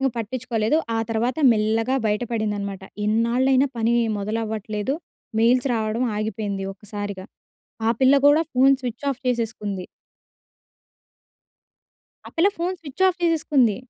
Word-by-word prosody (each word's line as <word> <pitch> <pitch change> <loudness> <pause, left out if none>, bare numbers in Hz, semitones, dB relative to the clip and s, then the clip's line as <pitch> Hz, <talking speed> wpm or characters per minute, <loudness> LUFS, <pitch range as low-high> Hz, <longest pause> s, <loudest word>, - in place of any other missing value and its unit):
ఇంక 270 - +2
పట్టించుకోలేదు. 230 +2 -1 0.2
ఆ - - +1
తర్వాత 230 +4 0 0.2
మెల్లగా 225 +3 +1
బయట 210 +2 0
పడిందనమాట. 205 -4 -2 0.2
ఇన్నాళ్లైనా 245 +5 +3
పని 230 +1 +2 0.2
మొదలవ్వట్లేదు, 215 +2 -2 0.5
మెయిల్స్ 245 +3 +3
రావడం 220 +1 -1
ఆగిపోయింది 210 -2 -3
ఒక్కసారిగా. 205 -1 -7 0.6
ఆ - - +4
పిల్ల 265 +1 +5
గూడా 290 +2 +6
ఫోన్ 265 +2 +5
స్విచ్ 245 +1 -5
ఆఫ్ 270 - -4
చేసేసుకుంది. 220 -6 -2 2.4
ఆ - - -7
పిల్ల 345 +5 +5
ఫోన్ 360 +2 -1
స్విచ్ 320 +4 -2
ఆఫ్ 365 -1 -3
చేసేసుకుంది. 295 - +2
230 Hz, 115 wpm, -23 LUFS, 215-260 Hz, 2.4 s, గూడా